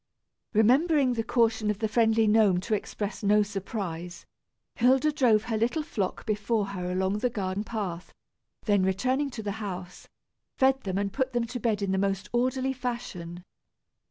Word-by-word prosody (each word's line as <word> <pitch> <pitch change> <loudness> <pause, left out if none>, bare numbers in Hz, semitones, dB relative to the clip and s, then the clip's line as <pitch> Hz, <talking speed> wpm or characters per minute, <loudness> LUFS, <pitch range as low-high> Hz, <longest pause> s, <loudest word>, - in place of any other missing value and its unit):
Remembering 260 +5 +4
the 225 -1 -1
caution 225 -2 +1
of 210 - 0
the 220 - -1
friendly 225 0 +3
gnome 210 -4 +4
to 215 - -3
express 205 -1 -3
no 210 +1 +4
surprise, 190 -4 -5 0.5
Hilda 260 +5 +4
drove 245 -8 +3
her 225 -2 -2
little 245 +8 0
flock 200 -9 -3
before 215 0 0
her 180 -2 -4
along 190 +3 0
the 250 - +1
garden 195 -3 -3
path, 195 -6 -5 0.5
then 205 -3 +3
returning 255 +10 +1
to 240 -4 -7
the 205 - -2
house, 180 -3 -7 0.5
fed 270 0 +3
them 190 -1 -2
and 200 -1 -1
put 260 -1 -1
them 240 -1 +1
to 245 +2 -5
bed 215 -3 0
in 195 - 0
the 190 - +1
most 195 0 -1
orderly 255 +2 +1
fashion. 195 -9 -5
215 Hz, 165 wpm, -27 LUFS, 195-245 Hz, 0.5 s, Remembering